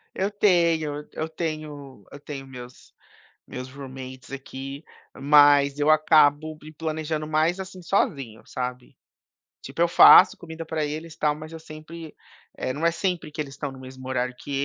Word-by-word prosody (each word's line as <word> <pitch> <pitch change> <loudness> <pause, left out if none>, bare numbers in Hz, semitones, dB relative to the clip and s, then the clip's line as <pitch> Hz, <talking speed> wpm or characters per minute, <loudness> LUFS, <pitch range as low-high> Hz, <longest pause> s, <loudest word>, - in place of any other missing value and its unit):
Eu 195 +2 -1
tenho, 170 -7 +2
e - - -17
eu 160 - -3
tenho 150 - -6
eu 140 - -10
tenho 140 -2 -8
meus 125 -1 -12 0.5
meus 125 0 -8
roommates 130 -1 -10
aqui, 135 +1 -7 0.3
mas 145 0 +5
eu 145 +1 +1
acabo 155 0 +4
me 155 +1 -12
planejando 155 -1 -4
mais, 160 +4 +1
assim, 185 -1 -8
sozinho, 140 - -1
sabe. 125 0 -6 0.6
Tipo, 140 +5 -3
eu 170 - +4
faço - - +8
comida 165 -1 -8
pra 160 -1 -2
eles, 155 +2 -6
tal, 150 -1 +1
mas 155 +1 -10
eu 165 - -7
sempre, 155 +1 -11 0.4
eh, 130 - -3
não 155 +5 -1
é 170 - +3
sempre 180 -4 -3
que 155 - -5
eles 140 -2 -5
estão 140 -3 -5
no 130 - -12
mesmo 130 0 -11
horário 125 -1 -1
que - - -10
150 Hz, 170 wpm, -24 LUFS, 135-160 Hz, 0.6 s, faço